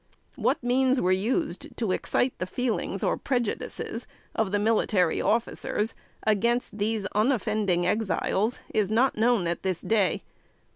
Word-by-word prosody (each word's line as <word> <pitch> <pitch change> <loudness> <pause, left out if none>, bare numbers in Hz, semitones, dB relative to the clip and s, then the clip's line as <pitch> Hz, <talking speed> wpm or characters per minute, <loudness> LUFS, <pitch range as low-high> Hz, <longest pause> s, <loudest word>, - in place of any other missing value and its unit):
What - - 0
means 260 +1 +3
were 185 - +2
used 205 - -1
to 225 -5 0
excite 245 +6 +1
the 185 - -2
feelings 245 +4 -2
or - - +1
prejudices 240 -2 -3 0.3
of 220 -4 0
the 205 - +2
military 205 -5 +2
officers 225 -1 0 0.3
against 220 +1 +1
these 215 0 0
unoffending 210 -5 +1
Exiles, 215 +2 0
is 210 -3 +2
not 240 +5 +3
known 225 -3 +2
at 170 0 -1
this 185 -3 -1
day. 205 -6 +1
220 Hz, 135 wpm, -27 LUFS, 195-240 Hz, 0.3 s, means